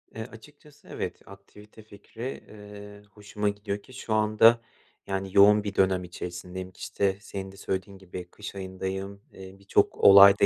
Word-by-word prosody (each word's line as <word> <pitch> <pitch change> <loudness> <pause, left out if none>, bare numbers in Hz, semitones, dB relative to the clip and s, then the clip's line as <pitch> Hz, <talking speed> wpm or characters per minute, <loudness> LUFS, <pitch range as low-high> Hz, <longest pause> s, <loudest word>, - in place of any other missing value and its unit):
Eee, 110 - -4
açıkçası 145 +5 -17
evet, - - -4
aktivite 105 +2 -15
fikri, 110 +4 -8
eee, 105 -1 -11
hoşuma 105 0 -3
gidiyor 100 0 -4
ki 130 - -16
şu 120 -4 -4
anda, 110 +2 +5 0.5
yani, 95 0 -3
yoğun 105 +1 +7
bir 100 -1 -5
dönem 95 -1 +2
içerisindeyim. 90 +1 -7
İşte, 95 0 -1
senin 95 -1 -7
de 100 - -16
söylediğin 95 0 -4
gibi 90 -1 -8
kış 105 +1 -9
ayındayım, 95 +1 -5
eee, 95 0 -11
birçok 100 0 +1
olay 100 0 +9
da - - +6
100 Hz, 155 wpm, -27 LUFS, 95-105 Hz, 0.5 s, olay